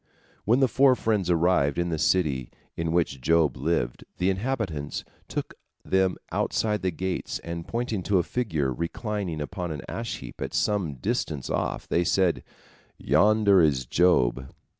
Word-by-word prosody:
When 120 +6 +3
the 135 - +5
four 130 +2 +4
friends 105 -7 0
arrived 85 -5 +2
in 85 0 0
the 80 -2 -2
city 75 -10 +1 0.3
in 85 -1 -2
which 80 -6 0
Job 80 -1 +3
lived, 65 -4 -1
the 90 +2 +2
inhabitants 95 - -3 0.2
took - - -4 0.3
them 95 -1 +2
outside 105 -3 0
the 95 - +1
gates, 90 +2 -3
and 85 0 -5
pointing 115 -4 -2
to 100 - +4
a 90 - +3
figure 80 - -1
reclining 90 - -3
upon 90 +2 -4
an 75 - -5
ash 115 0 -4
heap - - -10
at - - -4
some 95 -9 0
distance 65 +2 -2
off, - - -2
they 85 - +2
said, 90 -1 +2 0.6
"Yonder 100 +5 +4
is 70 -5 +2
Job." 65 -6 +2
90 Hz, 155 wpm, -26 LUFS, 75-105 Hz, 0.6 s, the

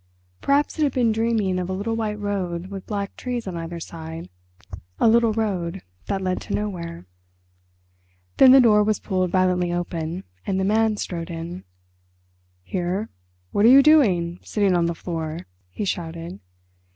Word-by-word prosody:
Perhaps 285 +3 +1
it - - +1
had 285 -3 +2
been 240 -3 +2
dreaming 220 -4 0
of 180 0 -3
a - - -1
little 210 +4 -2
white 215 -2 -2
road 190 -3 -3
with 195 -1 -7
black 200 -2 -3
trees 245 -2 -4
on 185 -3 -5
either 170 0 -5
side, 160 - -8 0.7
a - - +4
little 230 0 +4
road 195 -5 -2 0.2
that 195 -1 -2
led 185 0 -1
to - - -3
nowhere. 170 - -4 1.3
Then 260 - +8
the 270 - +9
door 215 -4 +5
was 215 0 +1
pulled 185 -2 -1
violently 180 -1 +1
open 175 0 -3 0.2
and 190 -1 -1
the - - +1
Man 215 +1 +2
strode 170 -4 -4
in. 170 - -6 1.0
"Here, 185 - -2 0.4
what 205 - +1
are 230 - +8
you 275 +1 +8
doing, 185 - +4
sitting 200 -4 +1
on 170 -1 +2
the 170 - -2
floor?" 165 -1 -5 0.2
he 205 - -4
shouted. 170 0 -4
190 Hz, 165 wpm, -23 LUFS, 170-215 Hz, 1.3 s, the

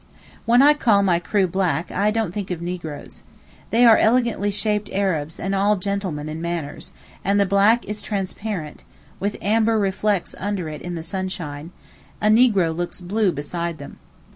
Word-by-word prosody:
When 240 +3 +6
I 295 +1 +7
call 220 -9 +3
my 175 -3 +2
crew 195 +2 +1
black, 180 -2 -1 0.2
don't 220 -4 -1
think 200 -2 -4
of 180 -3 -3
negroes. 170 -4 -6 0.5
They 240 +2 +4
are 225 -2 +8
elegantly 230 -3 +2
shaped 210 +1 -1
Arabs 165 -6 -1
and 195 +1 -2
all 200 +2 +3
gentlemen 185 -6 -3
in 155 +1 -5
manners, 170 -4 -5 0.3
and 200 +2 +2
the 200 - +4
black 200 +5 +3
is 210 0 -4
transparent, 195 -5 -4 0.4
with 205 +1 -2
amber 220 +2 +2
reflets 200 -1 0
under 200 -4 -2
it 150 -1 -7
in 175 0 -5
the 165 - -5
sunshine; 170 -4 -5 0.5
a 210 - +2
negro 215 -8 +4
looks 175 +2 -4
blue 195 +2 0
beside 170 +3 -4
them. 140 - -11
195 Hz, 165 wpm, -22 LUFS, 170-210 Hz, 0.5 s, are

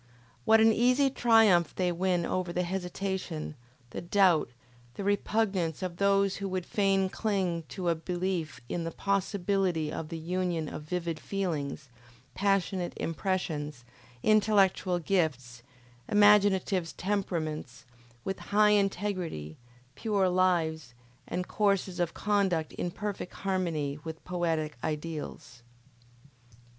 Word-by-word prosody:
What 220 -1 +6
an 225 0 +6
easy 255 +4 +3
triumph 225 - +4
they 180 -1 +1
win 175 0 0
over 185 -1 -1
the 180 +1 0
hesitation, 180 -3 -3 0.4
the - - -5
doubt, 175 -5 +3 0.5
the 200 - -5
repugnance 200 -4 0
of 175 -2 -4
those 200 0 +2
who 200 -1 -3
would 185 -1 -2
fain 195 -2 +2
cling 185 -5 -1
to 185 -3 -4
a 170 - +4
belief 175 -3 -3
in 170 - -3
the 165 - -2
possibility 190 -3 0
of 155 - -5
the 165 - -5
union 170 -1 -2
of 150 - -6
vivid 165 0 -3
feelings, 155 -8 -3 0.5
passionate 195 -2 0
impressions, 155 -7 -2 0.4
intellectual 200 -4 +3
gifts, 150 -9 -1 0.5
imaginative 200 -4 +4
temperaments, 175 -8 -3 0.4
with 195 - -3
high 210 +1 +5
integrity, 185 - -1 0.4
pure 200 - +1
lives, 160 -7 +1 0.3
and 180 0 -3
courses 195 -3 0
of 170 -2 -1
conduct 195 -6 0
in 175 - -3
perfect 200 0 -5
harmony 165 -7 -2
with 160 -1 -8
poetic 165 -5 -1
ideals! 150 -4 -5
180 Hz, 115 wpm, -29 LUFS, 165-200 Hz, 0.5 s, What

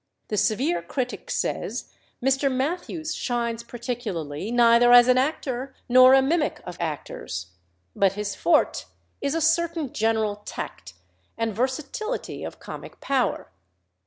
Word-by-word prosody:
The 210 - -1
severe 260 - +1
critic 255 -2 -4
says, - - -3 0.3
"Mr. 270 +1 +2
Mathews 315 +4 -2
shines 235 -2 -2
particularly 225 - -5
neither 240 0 +5
as 245 0 +9
an 255 0 +5
actor 265 -2 -2
nor 255 +1 +8
a 270 - +5
mimic 305 +2 0
of 180 - -7
actors; 130 - -5 0.4
but 195 -1 +3
his 205 0 -3
forte 330 -3 +2 0.4
is 280 +2 -1
a 330 - 0
certain 325 -3 +1
general 220 -2 +1
tact 90 - -8 0.4
and 225 -1 -1
versatility 275 - -3
of - - -7
comic - - -9
power. 270 -3 -1
245 Hz, 130 wpm, -25 LUFS, 220-275 Hz, 0.4 s, as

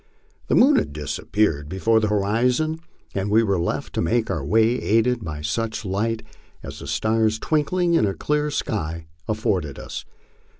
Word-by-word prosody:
The - - +2
moon 275 +3 +6
had - - 0
disappeared 75 +1 -1
below 110 +5 +2
the 110 - +1
hori 105 +4 +2
zon, 155 +5 -1 0.3
and 100 +1 -1
we 110 +2 +4
were 100 -4 +1
left 85 - -2
to - - 0
make 115 +5 +1
our 80 -7 -2
way 110 - +2
aided 115 +2 +2
by 75 -4 -5
such 110 +8 -2
light 110 +4 -1 0.4
as - - -8
the - - -8
stars 110 0 +1
twink 150 +5 0
ling 180 -2 +2
in 135 -10 +4
a 95 - -2
clear 150 - 0
sky 85 - -3 0.2
afforded 95 -9 -1
us. - - -6
110 Hz, 175 wpm, -23 LUFS, 95-120 Hz, 0.4 s, moon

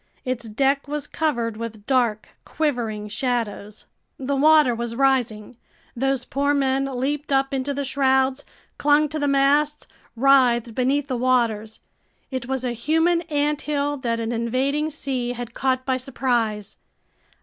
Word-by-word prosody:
Its 240 -3 -3
deck 275 +5 +1
was 295 0 -3
covered 235 -9 -1
with 220 -2 -7
dark, 240 -5 +1
quivering 235 -9 -2
shadows. 215 -2 -3 0.3
The 275 +1 -2
water 300 -2 +5
was 235 0 -4
rising. 245 -4 0 0.4
Those 265 0 0
poor 285 +1 0
men 270 -1 +1
leaped 275 +3 -3
up 270 0 +2
into 270 +1 -1
the 280 0 -2
shrouds, 265 0 +1 0.4
clung 295 +1 +3
to 310 +1 -3
the 290 - 0
masts, 285 +2 +2 0.3
writhed 245 -2 +4
beneath 265 +4 +1
the 255 -3 -2
waters. 235 -4 0 0.5
It 260 -2 -4
was 265 -1 -2
a 245 - -1
human 325 +8 +1
anthill 290 -1 0
that 235 -3 -2
an 225 0 -2
invading 260 +6 0
sea 260 -5 -3
had 240 -1 -7
caught 260 0 0
by 260 -1 +1
surprise! 240 -5 -2
260 Hz, 140 wpm, -23 LUFS, 235-280 Hz, 0.5 s, water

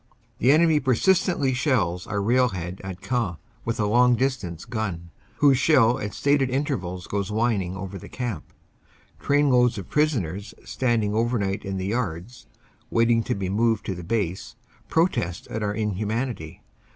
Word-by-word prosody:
The 125 - +5
enemy 160 0 +4
persistently 140 - +2
shells 120 - 0
our 100 -1 -2
railhead 100 -7 0
at 95 -1 -7
Queant 115 -10 -1 0.3
with 115 0 -2
a 105 - +2
long 120 +3 +4
distance 120 -11 -2
gun, 95 -8 -4 0.2
whose 140 -3 +4
shell 130 -4 +4
at 105 -3 -5
stated 140 -2 +2
intervals 115 - -2
goes 100 -2 -2
whin 110 -1 +1
ing 90 +1 -5
over 95 0 -6
the - - -11
camp. 120 - -5 0.7
Trainloads 125 -5 +3
of 95 - -8
prisoners 105 - 0
standing 115 -5 0
over 120 +3 +1
night 100 0 -2
in 95 -1 -4
the 95 - -3
yards 105 0 -4 0.4
waiting 115 0 +3
to 125 - -1
be 100 -2 -3
moved 110 +3 +1
to 95 - -2
the 90 -1 -8
base 95 -2 -2 0.3
protest 130 - 0
at 110 - -4
our 105 -1 -1
inhumanity. 105 -3 -3
110 Hz, 155 wpm, -24 LUFS, 95-125 Hz, 0.7 s, The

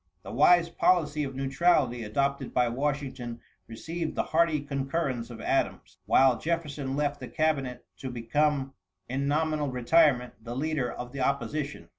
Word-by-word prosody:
The - - -8
wise 170 +6 +5
policy 155 -4 +2
of 135 -2 -5
neutrality 135 -3 +2
adopted 140 +5 -1
by 125 -1 +3
Washington 130 -2 -3 0.3
received 160 +8 -5
the - - +1
hearty 160 -1 +2
concurrence 135 -3 -2
of 120 - -9
Adams. - - -1
While 130 -3 +5
Jefferson 150 -4 -2
left 145 0 -1
the - - -7
cabinet 145 -6 -1
to 130 - -6
become 135 +3 0 0.3
in 135 +3 -2
nominal 155 0 0
retirement 125 -3 +2
the 120 +1 -6
leader 145 -2 -1
of 125 0 -7
the 140 - -7
opposition. 140 +2 -2
140 Hz, 145 wpm, -28 LUFS, 125-155 Hz, 0.3 s, wise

